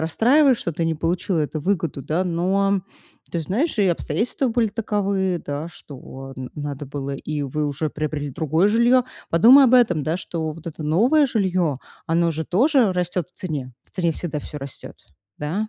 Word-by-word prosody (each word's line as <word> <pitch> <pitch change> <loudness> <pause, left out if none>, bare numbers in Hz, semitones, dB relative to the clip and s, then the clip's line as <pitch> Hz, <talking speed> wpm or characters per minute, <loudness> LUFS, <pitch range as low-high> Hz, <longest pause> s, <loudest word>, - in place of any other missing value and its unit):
расстраивает, 250 - +4
что 170 - -3
ты 165 +2 -2
не 165 0 0
получила 170 +3 -1
эту 155 0 -2
выгоду, 165 -5 -1
да. 160 +6 0
Но. 190 +3 +1 0.5
Ты 170 - -1
знаешь, 235 - -1
и 200 - +4
обстоятельства 175 - -1
были 230 -1 +1
таковы, 200 -4 -1
да, 145 +2 -4
что 135 -4 -11
н 130 -1 -6
надо 145 -1 -5
было 140 0 -5
И 150 +1 -4
вы 150 +2 -2
уже 145 +2 -2
приобрели 150 -1 -3
другое 160 +7 +1
жилье. 235 +4 +4 0.3
Подумай 240 +12 +8
об 255 -1 +5
этом, 195 -11 +4
да, 160 +2 0
что 165 -3 -4
вот 165 +1 -13
это 155 -1 -7
новое 240 - +4
жилье, 185 - 0 0.3
оно 170 +1 +2
же 160 +1 -3
тоже 240 - +3
растет 180 -1 -2
в - - -48
цене. 145 -8 -4
В - - -26
цене 170 -3 0
всегда 155 -1 -4
всё 150 - -8
растёт. 135 -1 -9 0.4
Да. 180 +9 -2
170 Hz, 180 wpm, -22 LUFS, 150-200 Hz, 0.5 s, Подумай